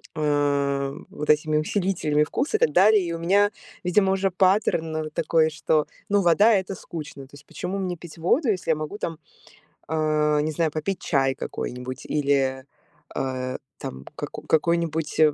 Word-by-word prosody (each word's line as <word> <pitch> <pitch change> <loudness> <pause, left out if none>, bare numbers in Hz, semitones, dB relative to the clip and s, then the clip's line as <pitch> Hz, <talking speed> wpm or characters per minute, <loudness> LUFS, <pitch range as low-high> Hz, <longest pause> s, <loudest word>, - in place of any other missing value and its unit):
а, 140 -2 +1 0.2
вот 150 - -6
этими 150 0 +3
усилителями 155 -3 +1
вкуса 260 - -1
и - - -14
так 150 - +3
далее. 205 +4 +6
И 170 - -3
у 165 - -4
меня, 200 +5 +3 0.3
видимо, 190 +2 +3
уже 195 0 0
паттерн, 185 -3 +2
ну, 155 0 -2
вот 155 0 -8
такой, 160 0 +2
что, 155 0 +1 0.2
ну, 205 0 +3
вода- 195 +5 +5
это 190 -1 0
скучно. 155 -5 -8
То 145 - -16
есть 145 +1 -15
почему 195 +2 -5
мне 185 -2 -2
пить 170 0 -12
воду, 230 - +2
если 185 -5 0
я - - +3
могу 155 +6 -5
там, 165 -6 -4 0.7
а, 155 -1 +1
не 155 +1 -1
знаю, 160 +1 0
попить 160 +6 -3
чай 135 -3 +1
какой-нибудь 125 -1 -6
или, 135 -3 +1 0.5
а, 130 -1 -2 0.2
там 65 +1 -7
каку - - -6
какой-нибудь 160 -1 0
155 Hz, 170 wpm, -24 LUFS, 150-185 Hz, 0.7 s, далее